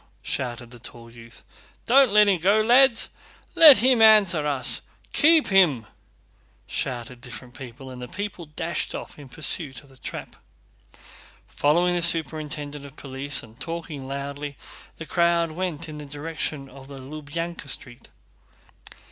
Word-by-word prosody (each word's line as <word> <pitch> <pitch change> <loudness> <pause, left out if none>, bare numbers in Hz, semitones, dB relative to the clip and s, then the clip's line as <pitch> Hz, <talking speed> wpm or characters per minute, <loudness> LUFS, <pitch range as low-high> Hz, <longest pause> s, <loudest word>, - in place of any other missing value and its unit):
shouted 120 -2 -4
the 120 - -13
tall 115 0 -11
youth. 115 0 -14 0.4
"Don't 265 0 +5
let 210 0 +5
him 190 -3 +2
go, 200 +5 +3
lads! 240 0 +4 0.4
Let 305 -5 +9
him 250 -1 +3
answer 200 -9 +5
us! 140 -3 0 0.3
Keep 315 +1 +4
him!" 170 - +3 0.8
shouted 125 -1 -4
different 125 0 -10
people 130 +1 -10
and 125 -1 -10
the 125 - -6
people 185 +1 -7
dashed 165 +3 -3
in 145 -3 -9
pursuit 150 -1 0
of 140 - -21
the 135 - -19
trap. - - -8 1.1
Following 175 +5 +2
the 175 - 0
superintendent 150 -3 +1
of 140 -1 -12
police 140 +1 -2
and 115 +2 -17
talking 160 -3 -6
loudly 140 +1 -6 0.4
the 165 - -8
crowd 170 0 +1
went 170 -1 -4
in 150 -1 -8
the 150 - -8
direction 150 -1 -5
of 135 0 -14
the 140 -1 -10
Lubyánka 155 +3 -7
Street. 120 -2 -6
150 Hz, 140 wpm, -24 LUFS, 135-175 Hz, 1.1 s, Let